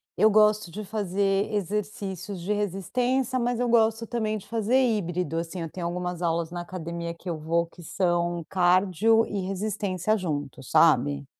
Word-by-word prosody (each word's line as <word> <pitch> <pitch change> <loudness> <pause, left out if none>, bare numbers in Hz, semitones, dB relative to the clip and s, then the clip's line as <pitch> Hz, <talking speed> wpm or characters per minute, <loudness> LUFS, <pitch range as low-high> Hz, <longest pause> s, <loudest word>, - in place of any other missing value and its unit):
eu 215 - +5
gosto 210 -2 +4
de 210 +5 -7
fazer 200 0 0
exercícios 205 -1 -3
de 185 +5 -1
resistência, 245 +6 0
mas 245 0 0
eu 245 - +1
gosto 225 -1 +3
também 215 -2 -1
de 200 - -11
fazer 230 +2 0
híbrido, 180 - 0
assim, 170 +2 -5
eu 165 - -5
tenho 175 -2 -4
algumas 180 0 -4
aulas 170 -1 0
na 175 0 -4
academia 170 -1 -5
que 170 - -14
eu 165 -3 -3
vou 165 +2 +1
que 170 +1 -16
são 175 -1 -1
cardio 190 +5 +3
e 195 -3 -3
resistência 195 0 -1
juntos, 145 - -4
sabe? 145 -3 +4
190 Hz, 165 wpm, -26 LUFS, 170-215 Hz, -, eu